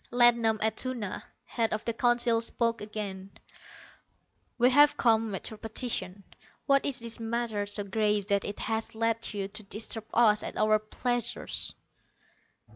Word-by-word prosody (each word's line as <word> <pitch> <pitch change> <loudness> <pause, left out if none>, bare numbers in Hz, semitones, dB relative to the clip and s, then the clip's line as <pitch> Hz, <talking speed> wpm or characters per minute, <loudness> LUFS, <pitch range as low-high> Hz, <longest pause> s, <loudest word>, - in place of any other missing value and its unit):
Ladnom 235 -2 +4
Atuna, 220 -2 -1 0.2
head 230 -2 -1
of 215 0 -3
the 230 - -1
Council, 240 -1 +2
spoke 230 0 -1
again. 200 -2 -6 1.3
"We 250 +1 +4
have 290 +2 +5
come 225 -3 +2
at 190 - -6
your 215 - -10
petition. 220 -4 0 0.4
What 275 -1 +3
is 275 - 0
this 230 0 -3
matter 225 -2 -2
so 205 0 -5
grave 210 0 0
that 200 -1 +2
it 205 - -5
has 225 0 -3
led 230 0 -1
you 200 -2 -3
to 215 +2 -8
disturb 215 +2 -4
us 215 -3 +4
at - - -6
our 215 0 +3
pleasures?" 240 +2 -1
225 Hz, 145 wpm, -29 LUFS, 210-235 Hz, 1.3 s, have